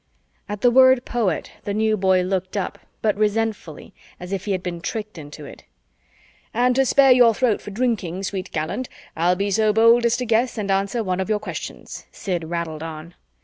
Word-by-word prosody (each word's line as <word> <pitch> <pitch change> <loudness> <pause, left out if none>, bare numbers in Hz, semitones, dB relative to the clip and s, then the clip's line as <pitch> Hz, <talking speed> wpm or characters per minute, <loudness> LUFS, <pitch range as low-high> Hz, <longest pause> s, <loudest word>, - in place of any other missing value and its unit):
At 205 -1 -5
the 245 - +5
word 260 0 +5
"poet," 215 -9 -1
the 205 - -3
New 220 0 +2
Boy 190 -2 +2
looked 185 +2 -2
up, 195 - -3 0.2
but 215 -2 +2
resentfully, 210 -5 -2 0.3
as 180 +2 -7
if 195 - -3
he 205 - -2
had 185 -1 -2
been 175 -2 -5
tricked 215 +3 -5
into 150 0 -10
it. - - -12 0.9
"And 245 +1 +3
to 270 0 +3
spare 270 0 +5
your 240 -3 +6
throat 245 -3 +1
for - - -8
drinking, 200 -5 -2
sweet 190 -1 -4
gallant, 160 +11 -3 0.3
I'll 175 +3 +2
be 200 +2 -1
so 215 +2 +3
bold 230 +2 +5
as 235 +1 +1
to 250 - -3
guess 230 +2 +1
and 200 -2 -2
answer 200 +4 0
one 185 -2 -2
of 190 - -2
your 215 - +2
questions," - - -8
Sid 175 -4 -4
rattled 165 -2 -4
on. 160 +1 -8
205 Hz, 195 wpm, -22 LUFS, 180-230 Hz, 0.9 s, your